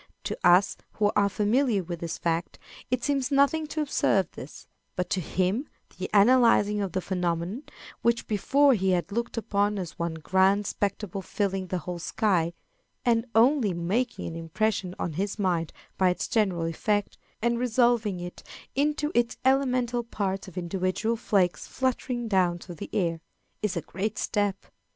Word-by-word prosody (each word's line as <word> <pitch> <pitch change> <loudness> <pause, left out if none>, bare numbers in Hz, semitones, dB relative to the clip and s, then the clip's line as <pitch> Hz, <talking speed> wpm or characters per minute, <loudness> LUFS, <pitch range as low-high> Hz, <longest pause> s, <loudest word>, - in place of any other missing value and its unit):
To - - -3
us, 180 +3 +5 0.2
who 210 -1 +2
are 200 -1 +4
familiar 210 +1 +1
with 170 0 -6
this 165 -1 -4
fact, 170 +1 -2 0.3
it 250 -1 0
seems 275 -3 0
nothing 285 +3 +3
to 310 +1 -2
observe 195 - +1
this, 135 - -10 0.3
but 180 - -2
to 185 - +1
him 190 - -1 0.3
the 185 - -3
analyzing 210 -1 +5
of 195 -4 -3
the 185 - 0
phenomenon, 180 +4 -2 0.4
which 235 0 +1
before 275 +7 +3
he 190 -4 +1
had 175 +2 -1
looked 235 +2 -3
upon 205 -1 0
as 180 -4 -6
one 170 -1 -2
grand 190 +5 +2
spectacle 200 -1 -2
filling 195 0 -2
the 185 - -2
whole 175 +1 -5
sky, 175 -3 +1 0.5
and 230 0 +2
only 230 - +4
making 205 +9 -1
an 165 - -5
impression 180 +3 -1
on 170 - -3
his 195 +6 -2
mind 175 -5 0 0.3
by 185 -1 +5
its 180 - -1
general 195 -8 +1
effect, 205 +5 -1 0.2
and 235 +1 +1
resolving 235 -5 +2
it 175 0 -7 0.3
into 295 +2 0
its 240 0 +1
elemental 255 -3 +2
parts 195 -4 -3
of 185 -1 -12
individual 185 +5 -1
flakes 195 -6 +1
fluttering 250 -2 -2
down 185 -4 +2
through 175 +1 -10
the 160 - -8
air, 165 -4 0 0.4
is 210 -5 -1
a - - -1
great 210 +7 -4
step. 205 -2 -1
200 Hz, 160 wpm, -27 LUFS, 180-235 Hz, 0.5 s, us